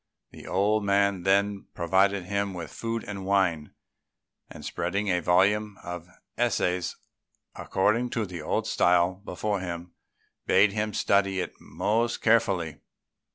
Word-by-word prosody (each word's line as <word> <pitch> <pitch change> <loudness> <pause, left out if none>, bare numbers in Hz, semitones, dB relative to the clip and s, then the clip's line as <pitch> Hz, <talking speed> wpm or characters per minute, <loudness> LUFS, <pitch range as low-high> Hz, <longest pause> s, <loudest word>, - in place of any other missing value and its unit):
The - - -12
old 105 +3 +1
man 100 -1 +2
then 100 +2 +1
provided 95 +3 +2
him 100 +1 -2
with 85 -2 -7
food 115 0 -3
and 100 -2 -6
wine, 95 -6 0 0.7
and - - -10
spreading 100 +4 -2
a 90 -1 +2
volume 100 +4 +2
of 90 -1 -6 0.3
essays 90 -7 0 0.6
according 115 +6 0
to 110 - +1
the 90 -4 -7
old 75 - -1
style 90 +2 +2
before 105 +2 -2
him, 85 -1 -6 0.5
bade 100 +1 +5
him 105 -1 -2
study 100 -1 +2
it - - -3
most 115 +2 -1
carefully. 100 -9 +2
100 Hz, 130 wpm, -27 LUFS, 90-105 Hz, 0.7 s, bade